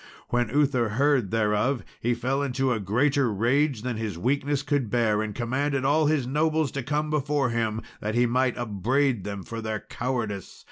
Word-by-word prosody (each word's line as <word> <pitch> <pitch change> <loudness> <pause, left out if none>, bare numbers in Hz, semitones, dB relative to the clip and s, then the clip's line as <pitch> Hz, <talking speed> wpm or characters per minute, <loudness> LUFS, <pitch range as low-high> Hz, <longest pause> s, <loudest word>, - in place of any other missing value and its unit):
When 120 -2 +1
Uther 130 -3 +2
heard 135 -7 +3
thereof, 110 +4 +1 0.2
he 120 +1 0
fell 135 +4 -1
into 135 -1 0
a 115 - -2
greater 125 +6 +2
rage 120 +4 +1
than 125 -3 -2
his 110 -6 -3
weakness 140 +7 0
could 145 -6 0
bear, 110 -3 +2
and 110 -1 -4
commanded 130 +3 -1
all 150 +2 +3
his 150 -4 +1
nobles 155 +2 +1
to 140 - -3
come 150 +4 -1
before 145 -3 +1
him, 115 -1 -1 0.2
that 105 +2 -3
he 120 +1 +4
might 125 +1 +1
upbraid 120 +2 0
them 100 -2 -5
for 115 -1 -6
their 110 -1 -3
cowardice. 115 -7 -4
125 Hz, 180 wpm, -26 LUFS, 110-140 Hz, 0.2 s, he